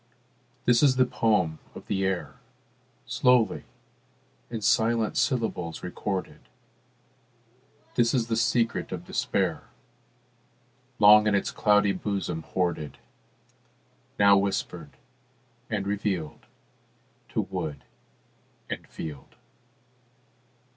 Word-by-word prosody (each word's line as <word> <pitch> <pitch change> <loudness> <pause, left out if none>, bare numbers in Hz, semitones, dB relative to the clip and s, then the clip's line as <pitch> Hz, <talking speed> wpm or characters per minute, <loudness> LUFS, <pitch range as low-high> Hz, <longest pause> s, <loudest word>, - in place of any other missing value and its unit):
This 120 -1 +4
is 135 -3 +5
the 130 0 +4
poem 95 -10 +1 0.2
of - - -10
the 95 -2 -1
air, 95 -1 -2 0.7
Slowly 125 -3 +2 0.8
in 115 -2 -5
silent 110 +1 +2
syllables 110 - -1
recorded; 95 +1 -4 1.5
This 115 -1 +3
is 120 -3 +1
the 115 0 -1
secret 115 0 0
of - - -5
despair, - - -1 1.3
Long 105 0 +7
in 105 - +3
its 100 - 0
cloudy 105 -1 +3
bosom 95 -4 -3
hoarded, 85 -4 -2 1.2
Now 100 0 +6
whispered 100 0 -3 0.7
and 100 -2 -2
revealed 100 -6 -3 0.9
To - - +3
wood 70 -2 -5 0.9
and - - -5
field. 75 -4 -8
105 Hz, 90 wpm, -27 LUFS, 90-115 Hz, 1.5 s, Long